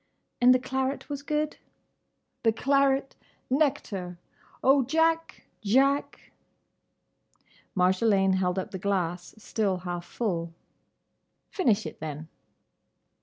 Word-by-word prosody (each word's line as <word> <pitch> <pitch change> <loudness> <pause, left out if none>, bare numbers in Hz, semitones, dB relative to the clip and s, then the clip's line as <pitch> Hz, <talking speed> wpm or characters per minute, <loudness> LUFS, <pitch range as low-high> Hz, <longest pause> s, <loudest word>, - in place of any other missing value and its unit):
"And 250 +1 +7
the 255 - +6
claret 265 +2 -3
was 285 -1 -4
good?" 300 +1 -2 0.8
"The 225 - +3
claret—! 275 +3 +1 0.4
Nectar!—Oh, 260 - 0
Jack!—Jack!—" 280 -4 0 1.5
Marjolaine 190 +1 +3
held 180 0 0
up 190 - -3
the 190 - -5
glass, 180 -3 -2
still 210 -3 -1
half 175 -1 -5
full. 170 -8 -3 1.0
"Finish 225 - +1
it, - - -7
then." 155 0 -6
220 Hz, 90 wpm, -27 LUFS, 180-275 Hz, 1.5 s, And